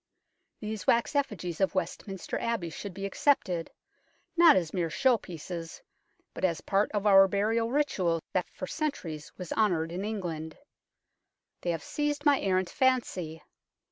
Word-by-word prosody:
These 215 Hz, -2 st, -5 dB
wax 235 Hz, +5 st, +3 dB
effigies 200 Hz, -, -1 dB
of 190 Hz, 0 st, +2 dB
Westminster 185 Hz, +1 st, -3 dB
Abbey 225 Hz, -8 st, -2 dB
should 200 Hz, +4 st, -6 dB
be 195 Hz, 0 st, -4 dB
accepted, 195 Hz, -, +1 dB, 0.7 s
not 340 Hz, -2 st, +8 dB
as 170 Hz, -4 st, 0 dB
mere 175 Hz, -3 st, 0 dB
show 260 Hz, +8 st, +3 dB
pieces, 170 Hz, -4 st, -7 dB, 0.5 s
but -, -, -8 dB
as 170 Hz, -3 st, +2 dB
part 200 Hz, +1 st, +1 dB
of 205 Hz, -1 st, -1 dB
our 195 Hz, -1 st, +8 dB
burial 220 Hz, +4 st, +1 dB
ritual 195 Hz, -, +1 dB
that 185 Hz, -2 st, 0 dB
for -, -, -6 dB
centuries 175 Hz, -, -4 dB
was 180 Hz, -3 st, -5 dB
honoured 175 Hz, -7 st, +1 dB
in 180 Hz, +3 st, -3 dB
England. 175 Hz, -7 st, -4 dB, 1.0 s
They 175 Hz, -, -2 dB
have 165 Hz, -3 st, -1 dB
seized 295 Hz, 0 st, -2 dB
my 285 Hz, -2 st, +5 dB
errant 185 Hz, -2 st, +1 dB
fancy. 210 Hz, -, 0 dB
195 Hz, 145 wpm, -29 LUFS, 170-230 Hz, 1.0 s, not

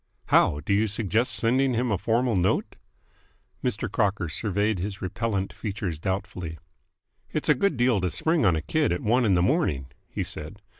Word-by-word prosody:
"How? 75 Hz, -, +4 dB
Do 90 Hz, -, -1 dB
you 105 Hz, +2 st, +3 dB
suggest 110 Hz, +3 st, +1 dB
sending 130 Hz, +2 st, +2 dB
him 120 Hz, 0 st, 0 dB
a 100 Hz, -, +2 dB
formal 115 Hz, +2 st, +1 dB
note?" 90 Hz, 0 st, +1 dB, 0.9 s
Mr. -, -, -1 dB
Crocker 95 Hz, -4 st, 0 dB
surveyed 105 Hz, +3 st, -1 dB
his 95 Hz, +2 st, -4 dB
repellent 100 Hz, 0 st, -2 dB
features 100 Hz, -7 st, -4 dB
doubtfully. 90 Hz, -3 st, -4 dB, 0.7 s
"It's -, -, -2 dB
a -, -, +8 dB
good 200 Hz, -9 st, 0 dB
deal 120 Hz, -4 st, +3 dB
to 90 Hz, -, 0 dB
spring 160 Hz, -, +1 dB
on 95 Hz, -5 st, +4 dB
a 80 Hz, -, -2 dB
kid 155 Hz, -, +1 dB
at 90 Hz, -, -1 dB
one 120 Hz, +3 st, +2 dB
in 100 Hz, -4 st, +4 dB
the 90 Hz, -, +3 dB
morning," 75 Hz, -, 0 dB, 0.2 s
he -, -, -3 dB
said. -, -, -5 dB
105 Hz, 180 wpm, -26 LUFS, 90-120 Hz, 0.9 s, a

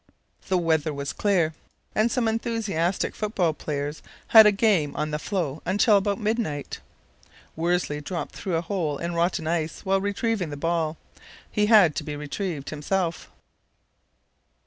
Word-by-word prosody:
The 190 Hz, -, +2 dB
weather 160 Hz, -3 st, +1 dB
was 140 Hz, 0 st, -4 dB
clear, 180 Hz, -6 st, +1 dB, 0.4 s
and 215 Hz, +2 st, +2 dB
some 250 Hz, -3 st, +1 dB
enthusiastic 220 Hz, -6 st, -1 dB
football 195 Hz, -6 st, 0 dB
players 145 Hz, 0 st, -4 dB, 0.3 s
had 220 Hz, -2 st, +9 dB
a -, -, +6 dB
game 195 Hz, -8 st, +2 dB
on 155 Hz, 0 st, -2 dB
the 150 Hz, -, -2 dB
floe 160 Hz, -6 st, -3 dB
until, 205 Hz, +2 st, +3 dB
about 200 Hz, 0 st, +1 dB
midnight, 215 Hz, -, -2 dB, 0.8 s
Worsley 165 Hz, -3 st, 0 dB
dropped 170 Hz, +3 st, -5 dB
through 185 Hz, -4 st, -3 dB
a 165 Hz, -, +1 dB
hole 165 Hz, -5 st, -2 dB
in 170 Hz, +3 st, -4 dB
rotten 170 Hz, -1 st, 0 dB
ice 160 Hz, -1 st, -2 dB
while 195 Hz, 0 st, +2 dB
retrieving 205 Hz, -2 st, -1 dB
the 145 Hz, -, -6 dB
ball. 165 Hz, 0 st, -1 dB, 0.5 s
He 210 Hz, 0 st, +2 dB
had 205 Hz, -9 st, +6 dB
to -, -, -2 dB
be 150 Hz, -2 st, -5 dB
retrieved 150 Hz, 0 st, -4 dB
himself. 165 Hz, +2 st, -2 dB
175 Hz, 145 wpm, -25 LUFS, 155-205 Hz, 0.8 s, had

